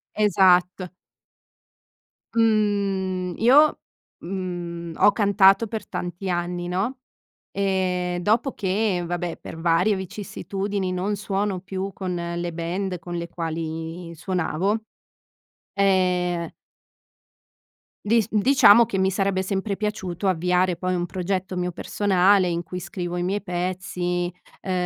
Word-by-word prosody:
Esatt 185 -3 +3 1.4
Mhmm, 200 -5 +1
io, 285 +6 +5 0.4
mhmm, 175 -2 -5
ho 205 - +5
cantato 200 0 +4
per 220 0 -5
tanti 180 +2 -4
anni, 175 0 -2
no, 195 +9 -2 0.5
e 185 -2 0
dopo 225 +8 +2
che, 195 -1 0
vabbè 175 0 -3
per - - -9
varie 175 +5 +3
vicissitudini, 195 0 -4
non 190 +3 -1
suono 200 -2 -2
più 190 +1 -4
con 185 -2 -4 0.2
le 175 0 -3
band 180 +3 -3
con 175 +1 -7
le 170 0 -4
quali 165 +1 -5
suonavo, 185 +3 -1 1.0
ehm 180 -3 +1 1.5
dis 220 0 +3
diciamo 230 0 +6
che 195 - -3
mi 190 0 +2
sarebbe 195 -1 0
sempre 195 +1 -2
piaciuto 200 -3 -3
avviare 180 0 +2
poi 185 +1 -2
un 175 0 -1
progetto 185 +1 -3
mio 180 0 -1
personale, 190 +1 +2
in 170 0 -2
cui 180 +3 -6
scrivo 175 -1 -5
i 175 - -1
miei 195 +3 -1
pezzi, 180 0 -2 0.3
uhm, 190 - -3
185 Hz, 115 wpm, -24 LUFS, 175-200 Hz, 1.5 s, diciamo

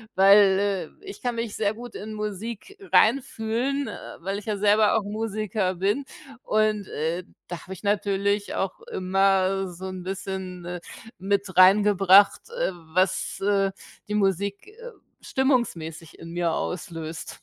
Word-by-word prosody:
weil, 195 -2 +4
äh, - - -17
ich 395 - -9
kann 245 -1 -2
mich 230 -2 -3
sehr 205 -1 0
gut 240 +1 -10
in 215 +1 -6
Musik 215 - -6 0.2
reinfühlen, 250 +2 +2
äh, - - -8
weil 195 +4 -3
ich 210 - -14
ja 215 -2 -2
selber 210 +1 +4
auch 215 - -1
Musiker 210 -2 -2
bin 200 +10 0 0.4
und, 215 -2 +1
äh, 165 +4 -2 0.2
da 175 -1 -6
habe 190 - -8
ich 190 - -12
natürlich 200 0 0
auch 190 -1 -3
immer 195 0 +1
so 180 +2 -9
'n 185 -1 -6
bisschen, 185 -2 -5
äh, 175 0 -5 0.4
mit 195 -1 -1
reingebracht, 195 - +6
äh, 480 - -1 0.2
was, 185 +1 +1
äh, 195 -1 +2 0.4
die 210 - -1
Musik, 200 - 0
äh, 470 +3 -11 0.3
stimmungsmäßig 175 - -1
in 165 0 -9
mir 175 -1 0
auslöst. 165 -2 -5
200 Hz, 145 wpm, -25 LUFS, 185-215 Hz, 0.4 s, reingebracht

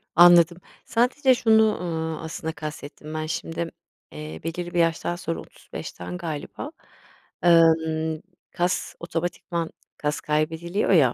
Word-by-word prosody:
Anladım, 175 0 +8 0.3
sadece 255 +3 +3
şunu, 220 -2 +4
eee, 160 -2 -3
aslında 160 0 -4
kastettim 150 0 -7
ben 155 0 -2
şimdi, 165 +1 -3 0.4
eee, 75 +1 -7
belirli 175 +1 -4
bir 175 - +1
yaştan 165 +1 +1
sonra 175 -2 -3
35'ten 90 - -8
galiba, 170 - -5 0.7
emm, 160 -2 +4 0.3
kas 175 0 -1
otomatikman 170 0 -3 0.3
kas 150 0 -1
kaybediliyor 160 +5 0
ya, 140 -10 +6
165 Hz, 115 wpm, -25 LUFS, 155-175 Hz, 0.7 s, Anladım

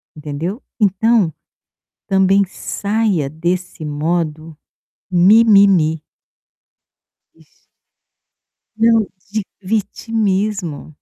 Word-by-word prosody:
Entendeu? 155 - -5 0.2
Então, 205 -2 +2 0.7
também 195 0 +3
saia 200 -5 -2
desse 175 +2 -3
modo 155 +1 -3 0.5
mimimi. 190 -4 +5 2.8
Não, 225 -1 +3 0.3
de 215 -1 -2 0.2
vitimismo. 205 -5 -2
190 Hz, 55 wpm, -18 LUFS, 160-215 Hz, 2.8 s, mimimi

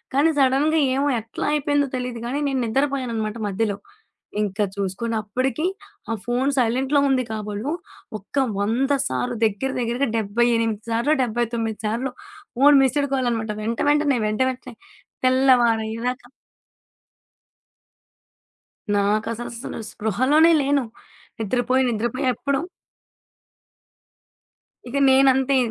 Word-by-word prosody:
కానీ 305 +4 +4
సడెన్‌గా 280 +4 +3 0.2
ఏమో 280 +2 +1
ఎట్లా 225 +5 -5
అయిపోయిందో 290 -1 +1
తెలీదు 250 -2 -5
కానీ 270 +4 -2
నేను 265 -2 -1
నిద్రపోయాననమాట 235 -3 -1
మధ్యలో. 205 0 -1 0.6
ఇంక 205 0 -3 0.2
చూసుకోండి, 200 +4 -3
అప్పటికీ 255 +8 -1 0.5
ఆ - - +1
ఫోను 250 +3 +1
సైలెంట్‌లో 260 +4 +2
ఉంది 255 -2 +1
కాబోలు, 215 +5 -4 0.5
ఒక 205 - -16 0.3
వంద 245 +7 0 0.2
సార్లు, 245 -2 -2
దెగ్గర 220 +6 -1
దెగ్గరగా 240 +2 0
డబ్బై 220 +3 +1
ఎనిమిది 225 -2 -1
సార్లో, 240 +7 +2
డబ్బై 240 0 0
తొమ్మిది 225 -2 -3
సార్లో 245 +4 -2 0.4
ఫోను 290 +2 +6
మిస్సుడు 280 +2 +1
కాలనమాట. 235 -4 -1
వెంట 230 +1 -2
వెంటనే, 295 -3 +2
వెంట 215 +4 -1
వెంటనే 250 -1 -11 0.5
తెల్లవారయ్యేదాకా. 245 -2 +2 2.7
నాకస్ 215 +3 0
అసలు 235 0 -7
స్పృహలోనే 260 - +3
లేను. 280 -2 +1 0.5
నిద్రపోయి, 250 +4 +1
నిద్రపోయి 240 +4 -2
ఎప్పుడో 280 +4 -1 2.3
ఇక 280 - -3
నేనంతే. 265 0 +4
245 Hz, 105 wpm, -22 LUFS, 225-270 Hz, 2.7 s, ఫోను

